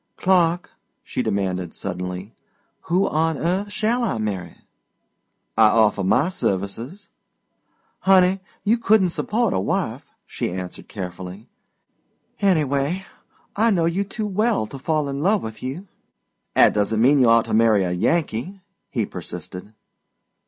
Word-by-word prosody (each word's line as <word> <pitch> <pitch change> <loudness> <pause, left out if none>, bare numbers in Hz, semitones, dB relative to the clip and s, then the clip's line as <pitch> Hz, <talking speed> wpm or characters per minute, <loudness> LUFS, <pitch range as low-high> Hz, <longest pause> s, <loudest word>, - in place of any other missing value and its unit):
"Clark," 175 -2 +2 0.3
she - - -3
demanded 90 -3 -2
suddenly, 90 +2 -5 0.5
"who 180 +4 +2
on 160 0 0
earth 190 +6 -1
shall 220 +4 0
I 220 - 0
marry?" 95 -6 -4 1.0
"I 110 - +6
offer 105 -2 +3
my 145 - +3
services." 120 - -3 0.9
"Honey, 190 0 +4 0.2
you 225 +3 +2
couldn't 210 -4 +4
support 220 +5 0
a - - +1
wife," 95 - -2 0.2
she - - -3
answered 90 0 -7
cheerfully. 95 +1 -7 0.9
"Anyway, 155 -1 +1 0.5
I 225 +3 +3
know 175 -6 +2
you 170 +4 0
too 210 +2 -5
well 210 - +1
to 135 +5 -9
fall 155 +1 0
in 140 0 -3
love 200 +4 +2
with 110 -1 -7
you." 145 +10 -5 0.7
"'At - - +6
doesn't 105 +1 +1
mean 135 +5 +5
you 125 -3 +5
ought 115 0 +5
to - - -4
marry 110 -3 +4
a 90 - -1
Yankee," 165 - -1 0.3
he 115 -5 -1
persisted. 90 +2 -8
140 Hz, 135 wpm, -22 LUFS, -, 1.0 s, I